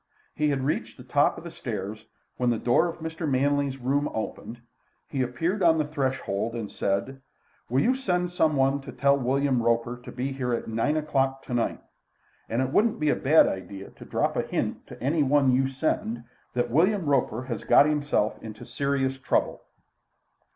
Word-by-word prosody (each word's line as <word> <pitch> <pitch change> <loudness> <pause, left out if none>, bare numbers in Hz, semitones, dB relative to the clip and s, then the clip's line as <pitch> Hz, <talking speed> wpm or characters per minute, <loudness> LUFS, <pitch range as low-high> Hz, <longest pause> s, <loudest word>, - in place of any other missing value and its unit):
He 150 0 +1
had 135 -2 0
reached 145 - -2
the - - -11
top - - +2
of - - -9
the - - -7
stairs 110 +3 -6 0.3
when 125 -1 +1
the 120 - +1
door 120 +9 +3
of 170 -1 -7
Mr. 160 -1 -3
Manley's 140 0 +1
room 140 +3 0
opened; 115 +1 -5 0.5
he 135 - -2
appeared 165 - -1
on 165 -2 +5
the 155 - +1
threshold 130 -7 -2
and 110 -3 -5
said: 100 +8 -2 0.5
"Will 130 +3 +2
you 250 - +3
send 180 -9 -1
some 160 -4 +2
one 135 +1 +2
to - - -9
tell 140 0 +3
William 135 -1 +1
Roper 115 +1 +1
to - - -9
be 130 +2 -3
here 125 -3 -1
at - - -5
nine 115 +7 0
o'clock 135 -3 0
tonight? 120 -2 -2 0.7
And 120 +3 +1
it 130 - -3
wouldn't 215 +7 +2
be 150 -1 +2
a - - +2
bad 150 +4 +5
idea 95 +1 -5
to - - -13
drop - - 0
a - - +2
hint - - -3
to - - -11
any 150 +5 +1
one 140 -1 +4
you 130 +1 +2
send 125 -4 -2 0.3
that 120 -1 0
William 185 - +3
Roper 135 -4 +1
has 120 -4 -5
got - - +6
himself 145 -7 0
into 110 -1 -9
serious 135 +1 -1
trouble." - - 0
135 Hz, 185 wpm, -26 LUFS, 120-150 Hz, 0.7 s, got